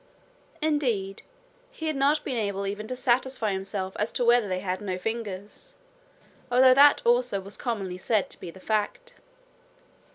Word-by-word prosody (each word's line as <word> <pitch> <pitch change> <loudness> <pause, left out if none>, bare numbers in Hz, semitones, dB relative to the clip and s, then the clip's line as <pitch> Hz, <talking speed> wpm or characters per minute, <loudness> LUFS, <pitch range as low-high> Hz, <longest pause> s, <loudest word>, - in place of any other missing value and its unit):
Indeed, 240 -11 0 0.5
he 415 -10 -8
had 310 -1 0
not 285 +3 +2
been 260 - -3
able 200 -3 -2
even 205 +2 -4
to 255 - -4
satisfy 255 -3 +1
himself 190 0 -4
as 210 +2 0
to 245 - 0
whether 235 -2 +4
they 185 -1 -2
had 185 0 -3
no 190 -3 -3
fingers, 215 - -4 0.8
although 255 +1 +7
that 285 +2 +6
also 240 -3 +2
was 195 +2 -9
commonly 195 -7 -3
said 215 +1 +1
to - - -8
be - - -7
the 190 - -12
fact. 220 - -2
220 Hz, 160 wpm, -26 LUFS, 195-255 Hz, 0.8 s, although